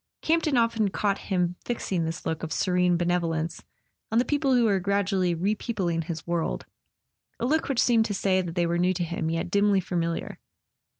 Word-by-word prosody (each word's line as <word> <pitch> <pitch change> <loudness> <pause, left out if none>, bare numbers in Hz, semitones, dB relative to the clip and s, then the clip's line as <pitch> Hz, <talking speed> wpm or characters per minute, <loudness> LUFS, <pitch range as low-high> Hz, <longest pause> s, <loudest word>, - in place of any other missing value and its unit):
Campton 315 -4 +2
often 230 -3 +2
caught 200 +2 0
him 180 -2 0
fixing 190 -8 -2
this 165 +1 -5
look 160 -1 -2
of 160 - -5
serene 180 0 +2
benevolence 170 -2 -1 0.5
on 225 - +2
the 245 - +4
people 285 -3 +2
who 245 - +4
were 200 -4 +3
gradually 190 -2 +1
repeopling 185 -3 -1
his 160 -2 -5
world, 170 -1 -2 0.7
a - - -1
look 310 +5 +1
which 270 - -1
seemed 230 -2 +4
to 205 - -2
say 190 -1 +2
that 175 -2 -6
they 175 -2 +2
were 170 0 0
new 180 +1 +2
to 175 - -1
him, 165 -1 -2
yet 165 +1 -2
dimly 200 -1 +3
familiar. 170 -2 -3
185 Hz, 185 wpm, -26 LUFS, 170-215 Hz, 0.7 s, the